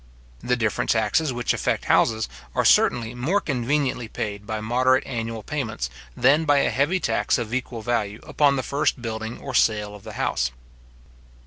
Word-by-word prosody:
The 125 +6 0
different 110 -3 -1
taxes 115 +7 +2
which 120 -1 0
affect - - -1
houses, 110 -1 +3 0.3
are - - +1
certainly 115 -1 +4
more 140 +12 +1
conveniently 130 - -1
paid 105 -1 -5
by 110 -1 -2
moderate 130 +4 +2
annual 115 -2 -4
payments, 110 - -3 0.3
than 140 +5 +4
by 145 -2 +3
a 140 - +2
heavy 145 +10 +1
tax 160 - +1
of 120 -2 -4
equal 125 -3 -3
value 105 -3 -1
upon 145 -2 +2
the 130 - -1
first 145 -1 0
building 110 0 -4
or 135 - -7
sale 105 -3 +2
of 105 -1 -12
the - - -9
house. - - 0
120 Hz, 170 wpm, -24 LUFS, 110-135 Hz, 0.3 s, certainly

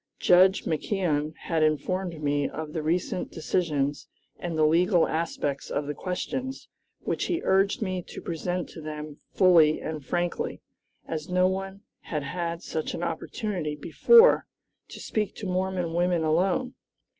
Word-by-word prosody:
Judge 185 +2 +5
McKeon 155 -3 -1
had 165 -2 0
informed 165 +2 0
me 145 -1 +1
of 155 -1 -6
the 160 - -2
recent 170 +3 -1
decisions 150 -4 -1 0.3
and 170 -2 -4
the 155 - +4
legal 175 +3 +4
aspects 145 -3 -2
of 145 - -2
the 150 - -3
questions, 255 - -4 0.3
which - - -2
he 345 -2 0
urged 195 +3 +2
me 185 -2 -2
to - - -8
present 175 +1 -3
to 165 - -10
them 150 -1 -7 0.2
fully 170 -5 +5
and 155 -2 -5
frankly, 175 +5 -2 0.5
as 160 0 -4
no 180 0 +3
one 195 +1 -4 0.2
had 150 -3 -4
had 170 +3 -4
such 160 -1 -3
an 170 - -4
opportunity 170 -1 -3
before 460 - +5 0.4
to - - -10
speak 210 -2 -2
to 210 - -7
Mormon 185 -2 -1
women 175 -1 +1
alone. 185 +10 +1
170 Hz, 145 wpm, -27 LUFS, 155-185 Hz, 0.5 s, Judge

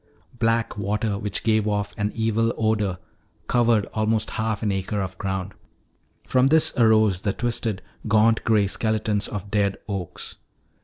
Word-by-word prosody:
Black 115 -2 +1
water 105 +1 -1
which 105 0 -2
gave 110 -1 +2
off 105 -1 -1
an 105 0 -1
evil 115 0 +1
odor 110 -4 0 0.5
covered 115 -4 +3
almost 110 0 0
half 110 -1 -2
an 105 - +1
acre 95 +2 -2
of 95 -1 -3
ground. 95 -1 -3 0.7
From 130 0 +3
this 160 +2 +4
arose 110 -5 +4
the 100 -1 0
twisted, 115 -4 -1 0.2
gaunt 110 +1 +3
gray 110 -3 +3
skeletons 110 0 0
of 100 -1 -6
dead 100 -2 +1
oaks. 95 -5 -5
105 Hz, 145 wpm, -24 LUFS, 100-110 Hz, 0.7 s, this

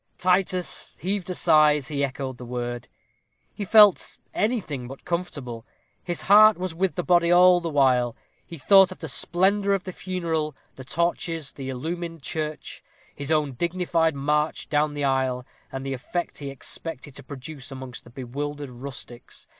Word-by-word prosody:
Titus 180 -2 0
heaved 190 +2 -2
a 180 - -2
sigh 155 -3 +5
as 150 0 -4
he 140 -2 -1
echoed 130 -2 -4
the - - -8
word. 120 0 -4 0.7
He 205 - -5
felt 210 -1 +5 0.2
anything 190 - -1
but 135 +2 -11
comfortable. 145 -10 -4 0.4
His 175 -2 -4
heart 215 +2 +7
was 185 -1 -4
with 185 +2 -1
the 180 - -2
body 175 -1 +3
all 180 0 +6
the 170 - -3
while. 125 -5 +2 0.3
He 170 - -10
thought 190 +6 +6
of 185 - -8
the - - -6
splendor 200 +3 +2
of 190 - -4
the 185 - -6
funeral, 165 -6 -2 0.2
the 130 - -10
torches, 165 +1 -2
the 135 -1 -7
illumined 165 +4 -5
church, 155 +1 -5 0.3
his 140 +1 -5
own 150 -3 +2
dignified 170 +1 0
march 150 +2 -1
down 150 0 +1
the 145 - -3
aisle, 130 -2 0 0.3
and 135 0 -5
the 135 - -2
effect 170 +7 -4
he 140 -2 -5
expected 140 +1 -7
to - - -10
produce 140 0 -9
amongst 130 -1 -8
the - - -15
bewildered 140 +3 -5
rustics. 125 -1 -9
155 Hz, 165 wpm, -25 LUFS, 135-180 Hz, 0.7 s, heart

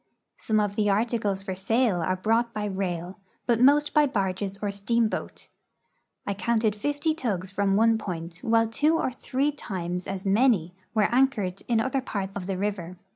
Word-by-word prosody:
Some 215 -1 +1
of 205 -1 0
the 210 -1 +2
articles 205 -2 0
for 195 -1 -4
sale 200 0 +1
are 185 +3 0
brought 225 +5 0
by 210 -1 -2
rail, 185 -1 -3 0.3
but 235 -1 +2
most 290 +3 +5
by 300 -1 +5
barges 195 -4 -2
or 205 -1 -2
steamboat. 220 +3 -1 0.8
I 200 - -1
counted 220 +1 +1
fifty 290 +8 -1
tugs 200 - -3
from 200 -1 +1
one 225 +1 +4
point, 170 -3 -6
while 225 0 +3
two 300 +8 +2
or 260 - -1
three 265 +3 -1
times 180 -9 -5
as 195 0 -5
many 195 -4 +3 0.2
were 215 -1 +4
anchored 235 -8 +1
in 235 -2 +2
other 260 +3 0
parts 195 -5 -4
of 190 -2 -5
the 195 -2 -2
river. 185 -3 -3
210 Hz, 175 wpm, -26 LUFS, 190-235 Hz, 0.8 s, most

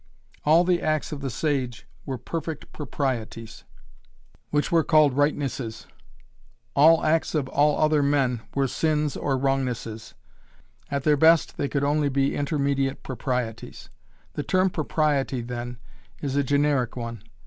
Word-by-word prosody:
All 160 +3 +6
the 180 -1 +1
acts 155 0 -1
of 145 -2 -5
the 135 - -3
sage 130 -2 -2 0.2
were 135 -2 -3
"perfect 160 +4 -6
proprieties," 120 -6 -4 0.8
which 150 0 0
were 165 -1 +4
called 155 -2 +4
"rightnesses." 140 -5 -1 0.9
All 160 +2 +6
acts 160 +1 +1
of 145 -4 0
all 145 +1 +2
other 155 -1 +3
men 135 -4 +1
were 135 -1 +2
sins 150 +1 0
or 135 -2 -1
"wrongnesses." 130 -5 -2 0.7
At 140 -1 -2
their 150 0 +3
best 160 +2 +4
they 140 - -1
could 140 -1 -1
only 145 0 +2
be 135 0 +1
"intermediate 140 -2 -1
proprieties." 125 -3 -4 0.4
The - - -3
term 185 +4 +1
"propriety," 150 -5 0
then, 120 0 -6 0.4
is 140 -2 -3
a 145 - +2
generic 140 -3 +1
one. 115 -3 -6
140 Hz, 135 wpm, -25 LUFS, 130-150 Hz, 0.9 s, All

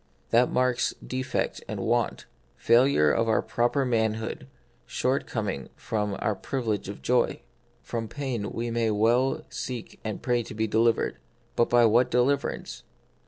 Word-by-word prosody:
That 120 +2 +4
marks 125 -1 +1
defect 130 0 -2
and - - -4
want, - - 0 0.3
fail 120 +3 +5
ure 75 - +3
of 115 +8 +1
our 110 - +2
proper 120 +4 +1
manhood, 110 +1 -1 0.4
shortcoming 110 - -2
from 105 -2 -2
our 110 - 0
privilege 110 -2 -3
of 100 - -8
joy. 125 -1 +1 0.4
From 115 -1 -4
pain 125 -6 -3
we 115 0 -3
may 115 -1 +1
well 120 +8 +2
seek 120 -1 -6
and 110 -2 -4
pray 120 -1 +2
to 110 - -8
be 110 +1 0
delivered; 115 +2 +2 0.4
but 120 - +2
by 120 -1 +5
what 115 +3 +4
deliverance 125 - 0
115 Hz, 145 wpm, -27 LUFS, 110-125 Hz, 0.4 s, fail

